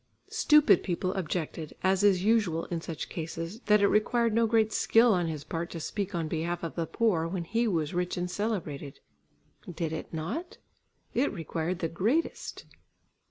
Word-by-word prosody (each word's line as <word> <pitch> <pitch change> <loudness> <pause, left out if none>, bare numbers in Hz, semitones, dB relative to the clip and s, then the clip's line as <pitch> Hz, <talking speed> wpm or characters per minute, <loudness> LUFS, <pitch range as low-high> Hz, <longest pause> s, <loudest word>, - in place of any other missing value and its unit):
Stupid 300 0 +5
people 185 0 -2
objected, 160 -3 -3
as 190 0 +3
is 190 -3 +4
usual 205 -7 +2
in 170 -1 -2
such 165 -2 -5
cases, 165 +4 -5
that 210 -1 +5
it 200 - +5
required 230 +2 +2
no 230 +1 +3
great 220 -1 +2
skill 230 0 +5
on 175 -2 +1
his 155 -3 -4
part 165 +3 -4
to 165 - -6
speak 195 +4 -3
on 165 -2 -1
behalf 170 +2 -2
of 165 - -3
the 165 -2 -2
poor, 180 -7 +1
when 175 0 -3
he 230 +7 0
was 160 -6 0
rich 180 0 -1
and 180 0 -2
celebrated. 165 -11 -3 0.7
Did 165 -2 -3
it 160 - -6
not? 200 - -4 0.6
It 260 +4 +2
required 165 0 -3
the 170 - -1
greatest. 220 - -1
180 Hz, 170 wpm, -29 LUFS, 165-215 Hz, 0.7 s, Stupid